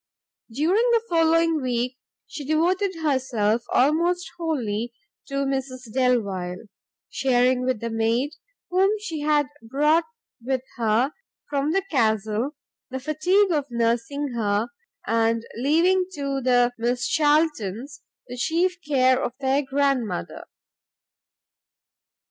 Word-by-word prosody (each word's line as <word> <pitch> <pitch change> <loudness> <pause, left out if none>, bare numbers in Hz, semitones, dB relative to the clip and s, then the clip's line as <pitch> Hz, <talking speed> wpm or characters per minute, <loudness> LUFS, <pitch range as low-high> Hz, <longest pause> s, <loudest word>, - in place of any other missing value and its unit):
During 360 - +2
the 460 -1 +3
following 330 -1 +3
week, 250 0 -2 0.3
she 295 - -8
devoted 355 +6 +1
herself 240 -6 +1
almost 340 +6 +2
wholly 240 -9 -2 0.3
to 275 0 -1
Mrs 260 -3 -4
Delvile, 200 -9 0 0.5
sharing 250 -1 +2
with 255 -4 -1
the 230 0 -3
maid, 230 +5 0 0.4
whom 380 +2 +4
she 345 -7 -5
had 295 0 +2 0.2
brought 295 +8 +2 0.4
with 260 0 -1
her 230 +4 +1 0.4
from 285 +1 0
the 390 +2 +1
Castle, 220 +1 0 0.3
the 260 0 -4
fatigue 355 +8 +2
of 295 -4 0
nursing 235 +5 -1
her, 210 -1 0 0.4
and 230 0 +1
leaving 340 +8 +3
to 275 -1 -2
the 245 -1 +3
Miss 245 +2 0
Charltons 290 - +1 0.2
the 250 0 -8
chief 350 +7 +1
care 260 -3 +3
of 240 - -2
their 270 +1 +2
grandmother. 270 - -1
265 Hz, 115 wpm, -24 LUFS, 235-310 Hz, 0.5 s, whom